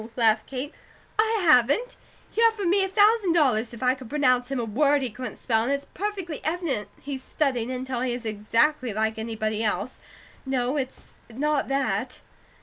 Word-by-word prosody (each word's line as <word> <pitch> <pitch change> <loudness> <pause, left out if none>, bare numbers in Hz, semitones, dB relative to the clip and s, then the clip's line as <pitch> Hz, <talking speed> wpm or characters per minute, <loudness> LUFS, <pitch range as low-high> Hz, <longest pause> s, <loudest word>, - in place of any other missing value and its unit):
laughed 220 -2 +3
Kate, 270 +3 -5 0.5
"I 440 -2 +2
haven't! 305 - +4 0.3
He 455 - -1
offered 445 -3 +3
me 385 +3 +3
a - - 0
thousand 410 -2 +4
dollars 250 -9 +2
if 235 +1 -8
I 255 0 +4
could 255 -3 -10
pronounce 255 -4 +2
him 270 -2 -2
a 235 - -1
word 280 +5 +2
he 250 - -3
couldn't 250 +4 -6
spell; 225 -3 +1
and 240 +4 -1
it's 280 0 -1
perfectly 380 -5 -4
evident 310 - -1
he's 275 -2 -5
studied 255 -5 -1
until 255 -1 -3
he 255 -1 0
is 240 -1 -5
exactly 230 +4 +1
like 220 0 0
anybody 220 -1 -2
else. 210 +3 -2 0.4
No, 260 0 -1
it's 265 -2 -5 0.2
not 290 +4 0
that!" 255 -3 -1
260 Hz, 175 wpm, -25 LUFS, 230-300 Hz, 0.5 s, haven't